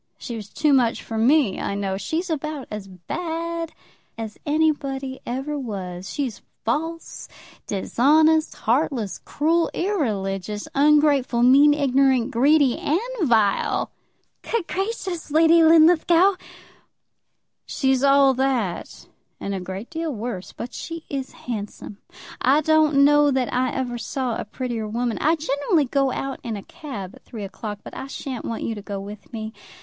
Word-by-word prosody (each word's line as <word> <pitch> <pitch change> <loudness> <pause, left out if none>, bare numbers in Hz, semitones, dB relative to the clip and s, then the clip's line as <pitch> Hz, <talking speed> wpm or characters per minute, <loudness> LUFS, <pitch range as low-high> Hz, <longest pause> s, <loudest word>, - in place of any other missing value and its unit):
She 235 - -6
was 210 -2 -7
too 300 -2 +2
much 245 -4 +2
for 225 - -6
me, 235 -1 +3
I 200 - -2
know. 195 -1 -2
She's 330 - -3
about 305 -2 -3
as 210 -2 -6
bad 330 - -4 0.5
as 220 -2 -6
anybody 280 -3 0
ever 270 +4 -3
was. 190 -6 -6
She's 265 -7 -3 0.2
false, 325 +7 -3 0.4
dishonest, 310 +10 +3
heartless, 235 - 0
cruel, 330 +3 +1
irreligious, 210 - -2
ungrateful, 285 -4 +3
mean, 280 +4 +6
ignorant, 270 -3 +2
greedy, 275 +2 +3
and 315 +4 +1 0.3
vile!" 215 -4 +2 0.5
"Good 460 -6 -2
gracious, 385 -3 -3
Lady 325 +2 +5
Linlithgow!" 330 +3 +6 1.3
"She's 265 -1 +1
all 275 -1 +5
that, 255 -8 -2 0.3
and 200 - -4
a 195 - -2
great 190 - -7
deal 325 -1 -3
worse. 220 -6 -5
But 240 - -7
she 330 -1 -6
is 270 -2 -4
handsome. 210 -3 -6 0.4
I 275 +5 +4
don't 310 -2 +4
know 295 0 +5
that 260 -3 0
I 255 0 +1
ever 245 -2 -3
saw 250 0 -2
a - - -4
prettier 230 0 -4
woman. 235 +1 -2
I 315 +3 +3
generally 290 +1 +1
go 275 +1 +1
out 270 +1 -4
in 225 -3 -4
a 200 - -8
cab 205 - -8
at - - -17
three 220 -4 -8
o'clock, 205 +1 -6
but - - -10
I 265 - -6
sha'n't 265 -2 -6
want 230 - -4
you 230 - -2
to 210 - -7
go 200 -1 -5
with 205 0 -10
me. 220 -1 -6
265 Hz, 145 wpm, -23 LUFS, 220-305 Hz, 1.3 s, mean